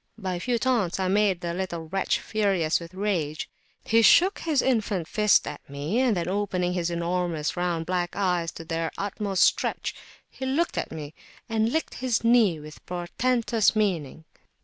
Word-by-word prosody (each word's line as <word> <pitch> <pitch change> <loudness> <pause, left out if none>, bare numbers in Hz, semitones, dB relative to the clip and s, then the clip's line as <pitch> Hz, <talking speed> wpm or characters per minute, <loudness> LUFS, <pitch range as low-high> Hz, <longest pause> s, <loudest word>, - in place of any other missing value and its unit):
By 190 -4 -3
a 175 - -3
few 240 +6 0
taunts, 230 -8 0
I 190 - 0
made 200 -2 +2
the 170 -1 -3
little 170 -3 -4
wretch 195 +3 0
furious 195 -7 +1
with 170 +1 -11
rage; 175 -6 -2 0.4
he 230 +1 +3
shook 365 - +5
his 310 -5 +1
infant 215 -9 0
fist 210 +1 +3
at - - -6
me, 145 - -2
and 250 -6 +2
then 170 -1 -2
opening 185 -2 -1
his 175 -1 -1
enormous 170 -2 -1
round 175 -2 -1
black 175 0 -2
eyes 180 -4 0
to 165 - -9
their 165 0 -2
utmost 200 -1 0
stretch, - - +1 0.3
he - - -10
looked 280 +6 0
at - - -4
me, 155 -1 -7 0.3
and 225 0 +1
licked 320 +3 -1
his 250 -3 0
knee 230 -8 +4
with 150 0 -12
portentous 225 +6 +1
meaning. 165 -8 -1
185 Hz, 170 wpm, -26 LUFS, 170-220 Hz, 0.4 s, shook